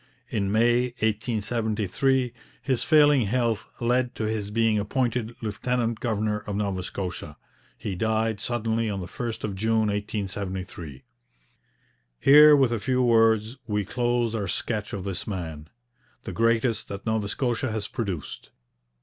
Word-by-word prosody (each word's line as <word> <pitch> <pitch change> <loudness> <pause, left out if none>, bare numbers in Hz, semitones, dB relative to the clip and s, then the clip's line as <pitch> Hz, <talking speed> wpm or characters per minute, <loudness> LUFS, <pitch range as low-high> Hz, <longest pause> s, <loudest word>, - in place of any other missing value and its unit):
In 100 -4 -1
May 120 +3 +3
1873 110 +3 0 0.3
his 130 -4 -1
failing 145 -6 +5
health 115 -2 0
led 125 +1 +1
to - - -3
his 110 -2 -2
being 110 0 +2
appointed 120 +1 -1
lieutenant 115 +2 -1
governor 110 -2 -1
of 105 -1 -5
Nova 100 -2 -1
Scotia. 90 -5 -5 0.4
He 100 - -4
died 110 +2 0
suddenly 115 -1 -1
on 100 -2 -2
the 90 - -5
1st 115 +4 -5
of 105 - -2
June 110 +2 +1
1873. 95 -7 -4 1.2
Here, 150 +2 +8
with 135 -4 +3
a 115 - -1
few 130 +3 +1
words, 115 0 +3
we 105 -2 -1
close 120 +1 0
our 105 -3 -2
sketch 105 +3 -2
of 100 -3 -4
this 95 -1 -4
man, 80 -6 -5 0.5
the - - -5
greatest 115 0 +1
that 100 0 -7
Nova 110 -2 0
Scotia 120 +1 -1
has 110 -2 -3
produced. 90 - -5
110 Hz, 140 wpm, -26 LUFS, 100-120 Hz, 1.2 s, Here